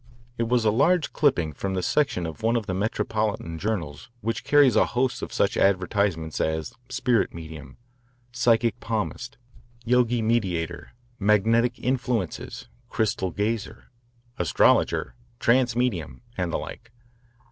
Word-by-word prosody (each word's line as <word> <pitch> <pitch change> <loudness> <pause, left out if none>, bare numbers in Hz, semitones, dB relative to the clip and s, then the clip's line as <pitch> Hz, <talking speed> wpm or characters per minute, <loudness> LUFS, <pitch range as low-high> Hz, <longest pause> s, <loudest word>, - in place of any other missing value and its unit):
It 115 -1 -2
was 120 -2 +2
a 105 - +4
large 155 +8 +2
clipping 85 - +2
from 95 +7 -3
the 90 - -1
section 140 - +1
of 80 -2 -7
one 115 +2 +2
of 115 -3 0
the 95 - -3
metropolitan 105 -3 -2
journals 85 - -3
which 115 +1 -2
carries 145 -3 +5
a - - +4
host 125 +1 -1
of - - -5
such - - +1
advertisements 95 -4 +1
as 80 -1 -2 0.2
"spirit 120 -8 +1
medium," 80 -5 -9 0.5
"psychic 120 -2 +2
palmist," 115 +2 -3 0.5
"yogi 120 -1 +2
mediator," 95 -8 -1 0.3
"magnetic 115 +4 +3
influences," 125 -7 -2 0.2
"crystal 105 -4 0
gazer," 105 +7 -3 0.5
"astrologer," 90 - +2 0.3
"trance 120 0 +3
medium," 95 - -2
and 90 -3 -2
the - - 0
like. - - -9
110 Hz, 130 wpm, -25 LUFS, 90-120 Hz, 0.5 s, carries